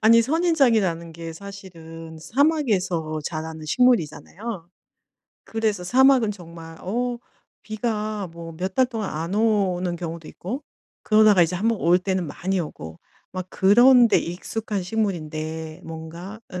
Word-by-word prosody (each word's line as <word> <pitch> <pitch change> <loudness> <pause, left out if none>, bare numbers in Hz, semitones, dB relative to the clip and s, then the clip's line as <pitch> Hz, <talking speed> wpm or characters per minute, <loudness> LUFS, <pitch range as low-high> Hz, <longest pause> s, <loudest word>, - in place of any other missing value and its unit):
아니 230 +1 +6
선인장이라는 230 - +2
게 165 0 -7
사실은 165 -4 -10
사막에서 190 - +1
자라는 160 -1 -5
식물이잖아요. 195 -2 0 0.8
그래서 220 -4 -1
사막은 255 +1 +5
정말 165 -4 -10
어 240 +5 -2 0.4
비가 215 -3 -3
뭐 165 0 -8
몇 185 +2 -3
달 260 -1 +4
동안 225 -5 -4
안 165 +5 -3
오는 195 -5 +1
경우도 165 -2 -6
있고 245 - -6 0.4
그러다가 215 -3 +5
이제 170 +2 0
1 200 +5 -1
번 225 -3 0
올 175 +2 +4
때는 185 -2 -1
많이 185 +5 -2
오고 80 - -7 0.3
막 185 -1 -4
그런 240 +5 +6
데 - - +4
익숙한 200 +3 -4
식물인데 160 -6 -3
뭔가 165 +5 -8 0.2
어 180 - -4
190 Hz, 280 characters per minute, -23 LUFS, 165-225 Hz, 0.8 s, 아니